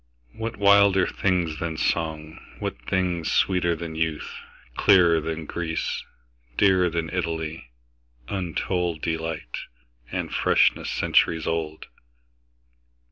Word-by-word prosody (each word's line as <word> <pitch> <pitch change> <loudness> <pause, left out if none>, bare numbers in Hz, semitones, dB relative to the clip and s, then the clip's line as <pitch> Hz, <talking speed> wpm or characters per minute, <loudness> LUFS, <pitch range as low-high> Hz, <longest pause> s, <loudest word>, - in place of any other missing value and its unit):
What 115 - -5
wilder 100 -1 +5
things 90 -5 0
than 80 -2 -3
song, 80 -1 -2 0.2
what - - -3
thingsSweeter 90 -1 +1
than 85 -1 -6
youth, 80 -1 -2 0.4
clearer 85 -5 +5
than 80 0 -4
Greece, 80 0 -3 0.5
Dearer 95 -3 +4
than 80 -1 -3
Italy, 80 -6 -3 0.6
untoldDelight, 80 -5 -2 0.5
and - - -3
freshness - - +3
centuries 80 -2 +2
old? 80 -1 -3
85 Hz, 90 wpm, -25 LUFS, 80-90 Hz, 0.6 s, wilder